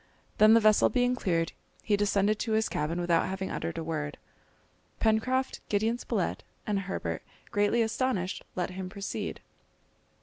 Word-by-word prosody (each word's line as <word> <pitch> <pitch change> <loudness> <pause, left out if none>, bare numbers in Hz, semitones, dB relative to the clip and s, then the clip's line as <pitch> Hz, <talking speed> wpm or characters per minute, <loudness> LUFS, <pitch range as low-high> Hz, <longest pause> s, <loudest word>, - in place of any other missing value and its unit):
Then 215 +1 +8
the - - +7
vessel 215 -1 +5
being 250 -1 +2
clear, 170 -8 +1 0.4
he 210 - +2
descended 205 +1 +2
to 225 - -1
his 220 0 +2
cabin 160 +4 -1
without 175 -1 +2
having 190 0 -3
uttered 165 - -3
a 165 - -2
word. 150 -2 -3 0.8
Pencroft, 255 +4 +1
Gideon 220 +3 +1
Spilett, - - -1 0.2
and 205 -2 0
Herbert, 135 - -3 0.3
greatly 205 +3 +3
astonished, 220 -5 -1
let 180 0 -1
him 185 0 -5
proceed. 200 +1 -5
205 Hz, 145 wpm, -29 LUFS, 180-220 Hz, 0.8 s, Then